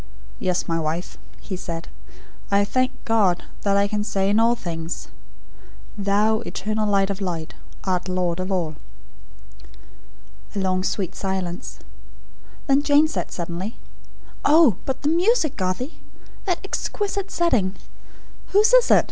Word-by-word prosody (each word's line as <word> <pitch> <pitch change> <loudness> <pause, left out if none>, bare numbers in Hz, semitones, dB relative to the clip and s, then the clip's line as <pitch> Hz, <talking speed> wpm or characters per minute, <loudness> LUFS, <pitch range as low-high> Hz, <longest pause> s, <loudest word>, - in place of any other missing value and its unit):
"Yes, 180 -1 0
my 165 0 0
wife," 160 +3 -3 0.2
he 190 - -5
said. 170 -2 -5 0.6
"I 200 0 +3
thank 255 +4 +1 0.2
God, 205 -6 +3 0.2
that 200 -1 +2
I 200 0 +3
can 210 0 -1
say 195 -2 +1
in 210 - +4
all 230 +1 +4
things: 165 -5 -5 0.9
'Thou, 210 +2 +2
Eternal 215 -2 -2
Light 195 -1 +3
of 200 +1 -5
Light, 170 -4 -3 0.3
art 185 -1 -1
Lord 180 -1 0
of 185 +1 -2
All.'" 170 -5 0 1.8
A - - 0
long 185 -1 +1
sweet 190 -2 -1
silence. 190 -3 -3 0.9
Then 275 -1 +4
Jane 295 +1 +5
said, - - -3
suddenly: 175 +6 -4 0.7
"Oh, 295 - +6
but 265 +1 -3
the 290 - +2
music, 345 - +3
Garthie! 185 - -2 0.5
That 360 -3 +1
exquisite 400 0 -2
setting. 225 - +1 0.8
Whose 425 +4 +5
is - - +6
it? - - +8
200 Hz, 135 wpm, -23 LUFS, 185-255 Hz, 1.8 s, it